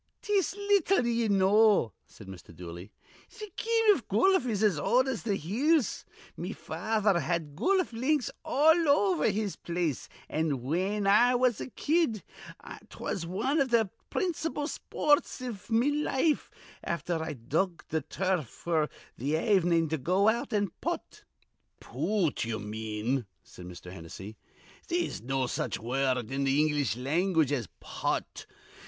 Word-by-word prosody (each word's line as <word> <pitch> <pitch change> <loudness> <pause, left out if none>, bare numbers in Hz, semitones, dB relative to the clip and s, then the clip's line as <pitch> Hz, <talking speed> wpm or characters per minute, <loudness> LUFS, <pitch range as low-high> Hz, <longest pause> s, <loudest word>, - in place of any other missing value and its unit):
"'Tis 395 -3 +1
little 400 -7 +2
ye 235 -1 +1
know," 200 - +4
said 105 - -14
Mr. 95 -3 -11
Dooley. 85 +3 -9 0.4
"Th' 425 -4 -10
game 455 0 +1
iv - - -8
goluf 380 -8 +3
is 215 -3 0
as 195 -8 +3
old 255 - +3
as 260 -4 -2
th' 205 -4 -1
hills. 260 - +1 0.3
Me - - -5
father 215 -4 0
had 160 -2 -2
goluf 370 - +1
links 260 +3 0
all 320 +3 +4
over 355 - +3
his 210 -1 -2
place, 170 -5 -3 0.2
an', 150 -5 -1
whin 190 +9 -1
I 235 +5 +5
was 245 -3 +2
a - - -5
kid, 295 - 0 0.7
'twas 170 -3 -4
wan 240 - 0
iv 275 -2 +2
th' 225 -5 +2 0.2
principal 325 -5 -2
spoorts 295 -3 0
iv 240 -7 -7
me 235 +5 +3
life, 300 0 0 0.3
afther 170 -1 -2
I'd 145 -8 -6
dug 170 +4 0
the 160 0 0
turf 175 - -1 0.2
f'r 160 -3 +1 0.3
th' 140 +6 0
avenin', 175 -3 +2
to 160 0 -1
go 185 +9 +3
out 235 +2 -1
and 205 -4 0
putt" 345 +1 -4 0.5
"Poot, 200 -7 -1
ye 115 -1 -2
mean," 110 +3 -3 0.2
said 90 - -12
Mr. 90 0 -10
Hennessy. 95 +4 -9 0.5
"They'se 345 0 -1
no 135 +2 -1
such 125 - -2
wurrud 125 0 -1
in 135 +1 -1
th' - - 0
English 150 -6 +1
language 160 +3 +1
as 125 -8 -1
putt. - - -3
195 Hz, 145 wpm, -29 LUFS, -, 0.7 s, I